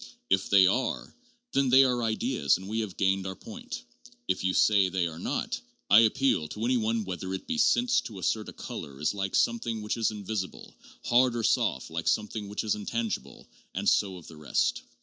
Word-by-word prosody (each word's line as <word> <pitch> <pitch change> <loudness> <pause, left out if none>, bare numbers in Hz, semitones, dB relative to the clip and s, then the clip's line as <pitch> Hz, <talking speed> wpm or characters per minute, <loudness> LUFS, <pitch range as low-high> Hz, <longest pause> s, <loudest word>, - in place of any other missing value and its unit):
If 95 0 +2
they 100 -2 +7
are, 125 +7 -1 0.4
then 135 -1 +2
they 130 +2 +7
are 125 -2 +1
ideas 110 - +1
and 95 +1 -10
we 110 +2 -2
have 105 -5 -4
gained 95 -1 +1
our 95 - -5
point; 240 +2 -8 0.2
but 245 - -18
if - - 0
you 95 - +2
say 100 -3 +4
they 90 -1 0
are 80 -1 -5
not, - - -3 0.3
I 100 - +9
appeal 115 - +2
to 105 +8 -4
any 125 +1 +2
one 115 -1 0
whether 95 0 -5
it - - -7
be 245 -1 -2
sense 245 +2 +3
to 110 -5 -10
assert 105 +3 -1
a - - -10
color 70 -1 -8
is 75 - 0
like 95 -1 -3
something 115 -2 0
which 105 - -2
is 115 - +2
invisible; 105 -2 -5 0.3
hard 125 0 +4
or 115 - -2
soft, 65 - +1
like 85 0 -4
something 105 -1 0
which 105 - -3
is 110 - +1
intangible; 110 +1 -4 0.3
and - - -2
so 95 -2 +2
of 85 - -13
the 80 - -12
rest. 75 -2 0
105 Hz, 210 wpm, -28 LUFS, 95-120 Hz, 0.4 s, I